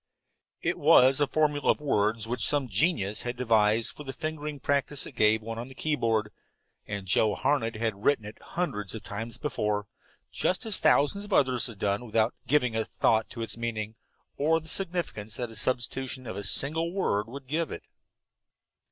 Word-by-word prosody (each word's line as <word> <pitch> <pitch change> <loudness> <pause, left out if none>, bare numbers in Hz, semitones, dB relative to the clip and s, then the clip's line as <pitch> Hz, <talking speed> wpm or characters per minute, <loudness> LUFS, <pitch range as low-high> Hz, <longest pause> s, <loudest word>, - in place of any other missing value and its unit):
It - - 0
was 130 +2 +6
a 145 - +3
formula 150 0 +1
of - - +4
words 110 -6 +1
which 120 -2 -2
some 145 -3 +1
genius 105 - 0
had 120 0 -3
devised 110 -2 +3
for 150 - -10
the 135 -2 -6
fingering 150 +1 -4
practice 140 +1 0
it - - -8
gave 110 -3 +3
one 115 +1 -5
on 120 - -5
the 130 - -13
keyboard, 115 -9 0 0.6
and 100 -2 -4
Joe 105 +2 +3
Harned 130 -5 +1
had 110 -2 -2
written 140 -7 +2
it 105 +1 -10
hundreds 105 - -3
of 110 - -7
times 115 +3 -5
before, 105 -8 -1 0.5
just 185 +7 -1
as 220 -4 0
thousands 200 +8 +3
of 205 - -5
others 130 -6 +3
had 115 -4 -9
done, 100 +3 0
without 115 0 +1
giving 125 -6 +2
a 110 - +1
thought 110 0 +1
to 115 - -5
its 115 - -4
meaning, 110 -2 -3 0.4
or 160 +3 +3
the 160 - -12
significance 165 - -2
that 120 -1 -3
the 115 - -11
substitution 130 +2 -1
of 95 - -5
a 100 - -5
single 160 - 0
word 110 - 0
would 135 +3 -9
give 155 +4 -1
it. - - -7
120 Hz, 185 wpm, -28 LUFS, 110-145 Hz, 0.6 s, was